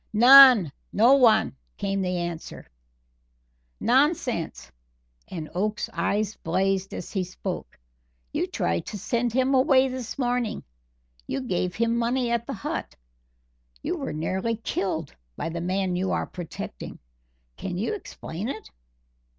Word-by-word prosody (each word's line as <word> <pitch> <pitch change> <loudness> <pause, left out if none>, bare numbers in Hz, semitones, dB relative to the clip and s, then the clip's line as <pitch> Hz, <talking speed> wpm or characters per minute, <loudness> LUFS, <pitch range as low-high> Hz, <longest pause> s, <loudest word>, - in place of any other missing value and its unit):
"None 245 - +9 0.2
no 235 +6 +5
one," 240 - +4 0.2
came 195 -1 -1
the 180 -1 -1
answer. 170 -2 -5 1.1
"Nonsense!" 245 - +1 0.6
and 160 -4 -6
Oakes's 210 +4 -2
eyes 205 +5 -1
blazed 190 +3 0
as - - -7
he 190 -3 -1
spoke; 180 - -6 0.6
"you - - 0
tried 85 0 -2
to 210 - -5
send 235 +4 -1
him 260 +3 +2
away 265 0 +5
this 255 -3 -6
morning. 245 -3 -1 0.6
You - - -2
gave 180 -7 -2
him 230 +1 +1
money 240 +1 0
at 235 0 -1
the - - -3
hut. 195 - -5 0.9
You - - -1
were - - -4
nearly 190 +9 -1
killed 185 -8 -3 0.2
by - - -3
the 170 +1 -4
man 185 +1 -1
you 185 +1 -1
are - - 0
protecting. 165 - -7 0.6
Can 180 -2 -5
you 220 - -1
explain 215 - -6
it?" 220 - -7
205 Hz, 135 wpm, -25 LUFS, 180-245 Hz, 1.1 s, None